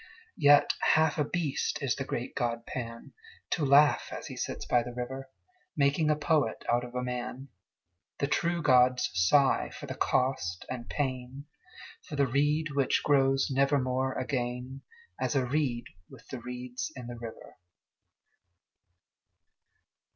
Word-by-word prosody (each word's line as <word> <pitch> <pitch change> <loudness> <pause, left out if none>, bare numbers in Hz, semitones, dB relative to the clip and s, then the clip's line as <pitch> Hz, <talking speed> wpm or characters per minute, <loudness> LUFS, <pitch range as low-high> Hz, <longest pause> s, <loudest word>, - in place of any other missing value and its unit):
Yet 145 -1 +6 0.2
half 160 0 +2
a - - +4
beast 150 -2 -1
is 130 -3 +1
the 135 - -3
great 125 -2 -4
god 115 -1 -2
Pan, 115 -2 -7 0.4
To 165 - 0
laugh 145 +1 +5
as - - -6
he - - -7
sits - - -4
by 120 - +3
the 120 0 -7
river, 130 +2 -5 0.5
Making 145 +2 +2
a 150 - +4
poet 150 -6 0
out 120 +1 +2
of 125 0 -9
a 125 - -1
man: 125 +2 -5 0.7
The - - 0
true 170 +4 0
gods 125 -5 +4
sigh 130 +11 +3
for - - -9
the - - -5
cost 125 -10 0
and 125 -2 -6
pain, 130 0 -3 0.6
For 150 - -8
the 140 -1 +3
reed 145 +4 +1
which 140 -2 +1
grows 135 -2 +3
nevermore 130 -1 +1
again 125 0 -3 0.4
As - - -1
a 130 -2 +2
reed 130 -3 0 0.3
with - - -15
the 130 - -5
reeds 125 +3 -5
in 125 -2 -8
the 120 0 -7
river. 115 -1 -10
130 Hz, 145 wpm, -29 LUFS, 125-145 Hz, 0.7 s, Yet